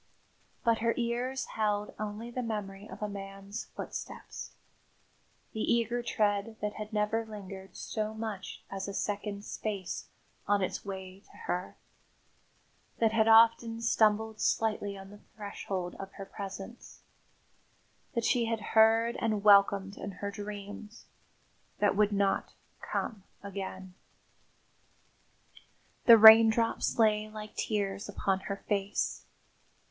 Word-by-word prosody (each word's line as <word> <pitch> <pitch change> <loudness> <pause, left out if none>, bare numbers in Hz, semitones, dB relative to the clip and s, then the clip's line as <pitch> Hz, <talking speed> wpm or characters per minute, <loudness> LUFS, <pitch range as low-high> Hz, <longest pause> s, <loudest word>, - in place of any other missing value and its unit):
But 230 -2 +3
her 230 0 +1
ears 245 +2 -1
held 210 -1 -1
only 215 +3 -5
the 255 - -3
memory 210 -3 -5
of - - -7
a - - 0
man's 195 +1 -7
footsteps - - -7 1.0
the 220 - -5
eager 235 +1 +1
tread 210 -2 0
that 210 0 -2
had 215 +1 -7
never 210 +1 0
lingered 195 -3 -9
so 215 -1 -3
much 220 -3 -6
as 195 0 -4
a 200 - -5
second's 205 0 -3
space 200 -4 -4 0.4
on 205 -1 +3
its 185 - -3
way 190 -1 -7
to - - -20
her; 180 +1 -3 1.2
that 225 -1 +3
had 220 0 +3
often 225 0 +6
stumbled 220 -1 +2
slightly 210 -2 0
on 195 0 -11
the 205 - -13 0.2
threshold 195 -4 -4
of 195 0 -7
her 195 - -8
presence; 195 +4 -9 1.1
that 235 -1 0
she 240 -2 +3
had 225 0 -1
heard 225 +1 +5
and 215 -3 0
welcomed 200 -1 +5
in 200 - -6
her 200 +2 -5
dreams; 205 +1 -8 0.7
that 205 - +2
would 210 0 +3
not 200 -1 0 0.3
come 215 -4 -3 0.2
again. 190 -2 -6 2.1
The 230 -1 +10
raindrops 225 +1 +7
lay 215 -1 +3
like 215 0 -8
tears 200 -2 -2
upon 195 -1 0
her 200 +1 -4
face. 200 -1 -1
210 Hz, 125 wpm, -31 LUFS, 200-225 Hz, 2.1 s, The